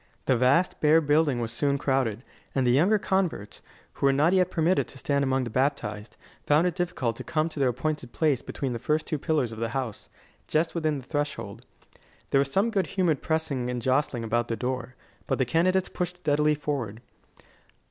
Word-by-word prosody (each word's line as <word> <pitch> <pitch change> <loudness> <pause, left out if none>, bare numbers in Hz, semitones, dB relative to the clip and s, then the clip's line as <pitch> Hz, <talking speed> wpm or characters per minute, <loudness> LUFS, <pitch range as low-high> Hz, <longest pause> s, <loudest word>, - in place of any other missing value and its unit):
The 130 - +3
vast, 130 +9 +2
bare 155 +2 +6
building 145 -3 +2
was 115 -1 -3
soon 140 +4 0
crowded, 130 -5 0 0.3
and 135 -2 +2
the 120 - +4
younger 175 - +4
converts, 185 - -2 0.3
who 140 - +1
were - - +5
not 150 +6 +3
yet 185 -1 +3
permitted 170 +1 +1
to - - -12
stand 140 +1 0
among 130 -1 +1
the 120 - -5
baptised, 120 -5 -2 0.3
found 150 +4 +4
it 180 - +1
difficult 165 - -2
to - - -6
come 155 0 0
to 155 - -8
their 135 -2 +3
appointed 145 0 -3
place 150 -6 +1
between 135 -3 -4
the 120 - -4
first 155 +5 0
two 155 - -2
pillars 150 -7 0
of 110 - -8
the 115 0 -1
house, 125 -5 -5 0.4
just 160 +2 +1
within 155 -3 0
the 135 - -8
threshold. 130 -6 -4 0.6
There 135 - +4
was 140 0 0
some 205 +7 +2
good 195 -4 0
humoured 175 -7 0
pressing 150 -6 -1
and 125 0 -2
jostling 130 -1 0
about 120 +1 0
the 115 - -2
door; 125 0 -4 0.3
but - - 0
the 130 - +1
candidates 180 +7 +2
pushed 180 0 -3
steadily 150 -2 +2
forward. 135 -7 -4
140 Hz, 200 wpm, -27 LUFS, 125-160 Hz, 0.6 s, bare